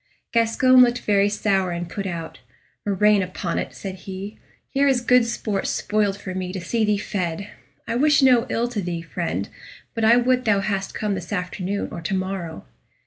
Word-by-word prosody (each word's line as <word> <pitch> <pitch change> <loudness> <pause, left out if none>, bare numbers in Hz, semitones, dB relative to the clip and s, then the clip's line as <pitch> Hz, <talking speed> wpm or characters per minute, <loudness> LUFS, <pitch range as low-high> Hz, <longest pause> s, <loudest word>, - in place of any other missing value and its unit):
Gascoyne 245 +3 +5
looked 245 0 +4
very 200 -1 +3
sour 195 -3 +1
and 175 0 -3
put 195 +3 -4
out. 165 -3 -6 0.5
"Murrain 205 +1 +4
upon 180 -2 -3
it!" - - -5
said 195 -2 -6 0.2
he; 195 +3 -7 0.3
"here 280 +1 +2
is 265 -2 +3
good 245 -1 +4
sport 210 -4 -2
spoiled 205 -2 0
for 190 -2 -6
me 185 -1 -3
to 190 - -4
see 220 +6 -1
thee 210 -1 +2
fed. 190 -2 -3 0.4
I 230 - -1
wish 295 +1 +4
no 250 -3 +5
ill 235 +1 0
to 225 -4 -3
thee, 170 -2 -4
friend, 165 - -3 0.5
but 225 - -2
I 230 +2 +6
would 250 +1 +2
thou 205 -3 +3
hadst 195 -1 -2
come 210 -2 -1
this 180 -3 -6
afternoon 185 +1 -3
or 170 - -6
to 170 +4 -2
morrow." 185 - -4
200 Hz, 190 wpm, -23 LUFS, 185-230 Hz, 0.5 s, I